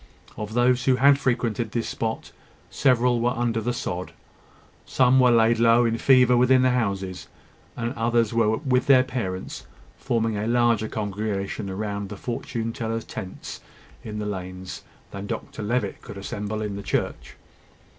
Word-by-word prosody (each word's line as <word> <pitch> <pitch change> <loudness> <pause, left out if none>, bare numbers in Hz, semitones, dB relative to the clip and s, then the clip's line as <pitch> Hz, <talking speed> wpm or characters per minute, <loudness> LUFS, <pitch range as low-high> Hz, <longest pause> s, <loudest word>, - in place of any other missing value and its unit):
Of 105 +1 -6
those 125 +1 +3
who 130 - +4
had 140 +2 +5
frequented 120 -4 -1
this 115 -1 -1
spot, 110 -1 -4 0.4
several 125 -3 +2
were 120 0 0
under 115 -2 0
the 120 +3 -1
sod; 90 -6 -4 0.7
some 130 0 +3
were 125 -1 +6
laid 115 0 +4
low 115 +1 +5
in 115 0 0
fever 125 -2 +5
within 125 +1 +4
the 130 - +4
houses; 100 -6 -2 0.5
and 120 +1 -2
others 115 -2 +1
were 110 -1 +2
with 130 -3 0
their 130 -2 +7
parents, 110 -8 -5 0.3
forming 115 -4 0
a 105 +2 -2
larger 120 -2 +2
congregation 105 -1 -3
round 100 0 -4
the 105 - -7
fortune 115 0 -4
tellers' 115 0 -3
tents 95 - -7 0.4
in 105 -1 -6
the 105 - -3
lanes, 95 -2 -6 0.3
than 100 0 -6
Dr - - -5
Levitt 105 -1 -2
could - - -10
assemble 105 +2 -4
in 100 -2 -4
the - - -5
church. - - -3
115 Hz, 155 wpm, -24 LUFS, 105-125 Hz, 0.7 s, their